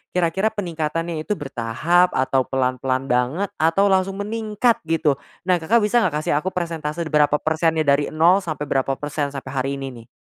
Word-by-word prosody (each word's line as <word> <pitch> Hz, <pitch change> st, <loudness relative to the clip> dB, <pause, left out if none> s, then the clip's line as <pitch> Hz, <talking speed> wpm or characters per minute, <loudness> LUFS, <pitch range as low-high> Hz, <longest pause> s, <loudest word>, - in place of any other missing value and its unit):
kira-kira 180 Hz, +4 st, +1 dB
peningkatannya 165 Hz, -4 st, -3 dB
itu 210 Hz, -, +1 dB
bertahap, 145 Hz, +6 st, +1 dB
atau 130 Hz, 0 st, +1 dB
pelan-pelan 130 Hz, 0 st, -1 dB
banget, 130 Hz, +11 st, 0 dB
atau 180 Hz, +6 st, +3 dB
langsung 190 Hz, 0 st, +1 dB
meningkat 225 Hz, +2 st, 0 dB
gitu? 160 Hz, -4 st, +1 dB, 0.2 s
Nah, 180 Hz, -1 st, +2 dB
Kakak 210 Hz, +8 st, +2 dB
bisa 235 Hz, +3 st, +3 dB
nggak 180 Hz, -9 st, 0 dB
kasih -, -, -1 dB
aku 180 Hz, -, -7 dB
persentase 165 Hz, -2 st, -3 dB
berapa 150 Hz, -1 st, +4 dB
persennya 160 Hz, 0 st, +1 dB
dari 140 Hz, 0 st, +2 dB
0 170 Hz, +5 st, +5 dB
sampai 155 Hz, -6 st, -4 dB
berapa 135 Hz, 0 st, +1 dB
persen, 145 Hz, -1 st, -4 dB
sampai 135 Hz, -1 st, -6 dB
hari 135 Hz, +1 st, -2 dB
ini 135 Hz, -1 st, -5 dB, 0.2 s
nih? -, -, -34 dB
160 Hz, 170 wpm, -21 LUFS, 140-185 Hz, 0.2 s, 0